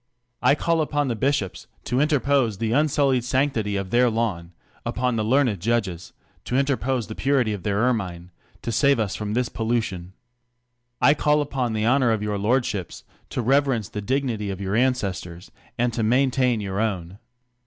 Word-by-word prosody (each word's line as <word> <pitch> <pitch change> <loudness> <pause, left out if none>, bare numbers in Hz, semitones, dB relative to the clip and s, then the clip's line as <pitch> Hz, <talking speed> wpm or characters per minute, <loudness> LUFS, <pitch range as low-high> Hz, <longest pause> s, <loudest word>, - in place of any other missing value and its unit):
I 130 +3 +4
call 165 +1 +1
upon 145 -2 0
the 120 - -1
bishops 130 -4 -1 0.2
to 125 - -1
interpose 140 - +2
the 110 +2 -1
unsullied 140 -2 +2
sanctity 125 -5 0
of 95 -1 -3
their 125 +1 +4
laicn; 110 -7 -2 0.3
upon 120 +1 -1
the 110 - 0
learned 120 -3 +2
judges, 100 -4 -1 0.3
to 125 - -1
interpose 135 -3 0
the 110 - -7
purit} 130 -3 +1
of 100 - -5
their 100 +2 0
ennine, 90 -7 -2 0.3
to 115 - -2
save 140 +1 +3
us 105 -4 -1
from 105 0 -3
this 125 0 +1
pollution. 110 -7 -2 0.9
I 145 - +7
call 150 0 +2
upon 135 -5 -1
the 110 0 0
honor 125 0 +3
of 110 -2 0
your 105 -1 -2
lordships, 105 -4 -1 0.3
to 125 - -3
reverence 135 -4 +2
the 105 - -5
dignity 120 -3 -1
of 95 -1 -4
your 100 +1 -2
ancestors, 100 -8 -1 0.3
and 120 0 +1
to 115 - -2
maintain 125 0 +2
your 100 -1 -3
own. 95 -4 -2
115 Hz, 170 wpm, -24 LUFS, 105-135 Hz, 0.9 s, I